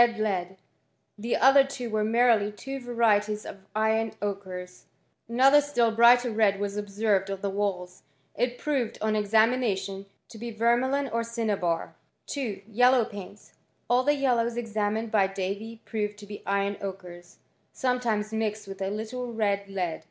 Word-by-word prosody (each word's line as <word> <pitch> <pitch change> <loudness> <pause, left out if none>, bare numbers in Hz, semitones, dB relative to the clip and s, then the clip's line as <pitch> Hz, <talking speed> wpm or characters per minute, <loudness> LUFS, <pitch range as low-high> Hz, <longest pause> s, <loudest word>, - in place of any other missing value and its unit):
81 235 -1 +1
ftd 215 - 0
lead; 190 -3 -2 0.6
the 230 +3 0
other 270 +2 +7
two 270 -3 -6
were 215 0 +1
merely 225 -2 +3
two 270 +6 -7
varieties 215 -4 +1
of - - -8 0.2
iron 220 0 +1
ochres, 185 -3 -6 0.4
Ancpther 270 +5 +6
still 245 -6 +1
brighter 240 +2 +5
red 210 -3 +2
was 200 0 -3
obsen 205 +1 -5
ed 195 +1 -6
on 195 -1 -4
the 200 - -2
walls; 190 -3 -3 0.3
it 245 +2 -1
proved, 270 -6 -1
on 215 0 0
examination, 210 -2 +1 0.2
to 220 - -11
be 235 +1 -5
vermi 235 +4 +2
lion 280 0 0
or 230 0 -1
cinnabar. 210 -8 -2 0.3
2. 225 -9 -4
Yellow 245 +2 +4
painlg. 205 0 -10 0.4
All 245 +1 +5
the 290 +2 +3
yellows 240 -4 +1
examined 220 -1 -2
by 200 -3 +4
Davy 200 +4 -5
proved 210 -2 -3
to 205 - -11
be 205 0 -9
iron 200 0 0
ochres, 180 -3 -8 0.3
sometimes 235 -5 -1
mixed 215 -1 -2
with 195 0 -8
a 190 - -1
little 230 +4 -4
red 200 -3 0
lead. 180 -4 -2
215 Hz, 160 wpm, -27 LUFS, 200-240 Hz, 0.6 s, other